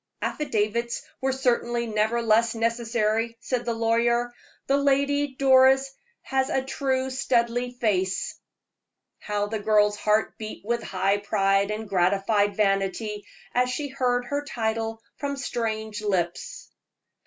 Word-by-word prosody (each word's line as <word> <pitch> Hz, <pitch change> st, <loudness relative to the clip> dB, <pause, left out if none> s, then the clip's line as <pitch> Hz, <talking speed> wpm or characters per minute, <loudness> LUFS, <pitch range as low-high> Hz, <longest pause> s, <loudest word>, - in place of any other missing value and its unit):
"Affidavits 235 Hz, -4 st, -1 dB, 0.2 s
were 265 Hz, 0 st, +1 dB
certainly 240 Hz, -2 st, 0 dB
never 220 Hz, +2 st, 0 dB
less 230 Hz, +1 st, +3 dB
necessary," 230 Hz, 0 st, 0 dB
said 245 Hz, +1 st, -2 dB
the 235 Hz, -, -1 dB
lawyer 235 Hz, +1 st, +1 dB, 0.3 s
"the 275 Hz, -, +2 dB
Lady 280 Hz, 0 st, +1 dB
Doris 265 Hz, 0 st, +5 dB, 0.3 s
has 265 Hz, 0 st, 0 dB
a 265 Hz, -, 0 dB
true 265 Hz, -1 st, -1 dB
Studleigh 245 Hz, -1 st, 0 dB
face." 190 Hz, -4 st, 0 dB, 0.9 s
How 205 Hz, -1 st, -2 dB
the 215 Hz, +1 st, -3 dB
girl's 210 Hz, 0 st, +3 dB
heart 215 Hz, +1 st, +1 dB
beat 215 Hz, -2 st, -7 dB
with 235 Hz, +1 st, 0 dB
high 195 Hz, +1 st, 0 dB
pride 195 Hz, 0 st, +1 dB
and 215 Hz, +1 st, -4 dB
gratified 200 Hz, +2 st, +2 dB
vanity 205 Hz, +1 st, 0 dB, 0.3 s
as 250 Hz, 0 st, +2 dB
she 285 Hz, +3 st, -3 dB
heard 250 Hz, -2 st, 0 dB
her 285 Hz, +3 st, -2 dB
title 225 Hz, -3 st, -3 dB
from 280 Hz, -1 st, -3 dB
strange 220 Hz, -5 st, -3 dB
lips! 180 Hz, -5 st, -2 dB
230 Hz, 125 wpm, -25 LUFS, 210-255 Hz, 0.9 s, Doris